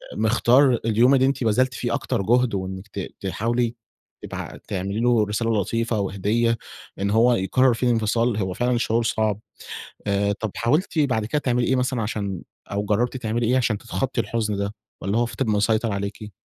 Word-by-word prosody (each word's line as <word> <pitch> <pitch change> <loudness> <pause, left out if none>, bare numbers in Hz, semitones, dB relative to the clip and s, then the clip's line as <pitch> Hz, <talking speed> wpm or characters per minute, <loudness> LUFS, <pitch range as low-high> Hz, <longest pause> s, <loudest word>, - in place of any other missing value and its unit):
مِختار 120 +3 +4
اليوم 115 +4 +4
اللي 130 0 +4
أنتِ 135 -2 0
بذلتِ 125 +4 +2
فيه - - -2
أكتر - - -1
جُهد، 120 +3 +2
وإنِّك 95 +1 -4
ت 100 - -7 0.2
تحاولي 115 +5 -1 0.5
تبع - - -6
تعملي 100 +1 -3
له 120 -2 +3
رسالة 105 0 0
لطيفة 115 +2 -1
وهديّة، 105 +4 0 0.4
إن 100 - 0
هو 115 +4 +4
يقرّر 120 +5 +3
فيه 125 +2 -1
الإنفصال 115 0 +1
هو 95 -3 -1
فعلًا 120 +4 +1
شعور 115 0 +1
صعب. 110 -2 0 0.7
آآ 100 0 +1
طب 105 +1 -4
حاولتِ 150 +8 0
بعد 125 -8 +2
كده 150 +7 0
تعملي 125 -4 0
إيه 130 - +2
مثلًا 125 -2 0
عشان 100 -4 -3 0.3
أو 100 0 -1
جرّبتِ 115 +5 0
تعملي 115 -1 -1
إيه 125 +3 +3
عشان 120 -4 +1
تتخطّي 125 +2 -2
الحُزن 110 -3 -1
ده 100 +1 -3 0.3
والّا 100 +4 0
هو 120 - +2
فِضِل 115 +1 -2
مسيطر 110 +1 +1
عليكِ؟ 100 +1 -5
115 Hz, 175 wpm, -23 LUFS, 105-120 Hz, 0.7 s, مِختار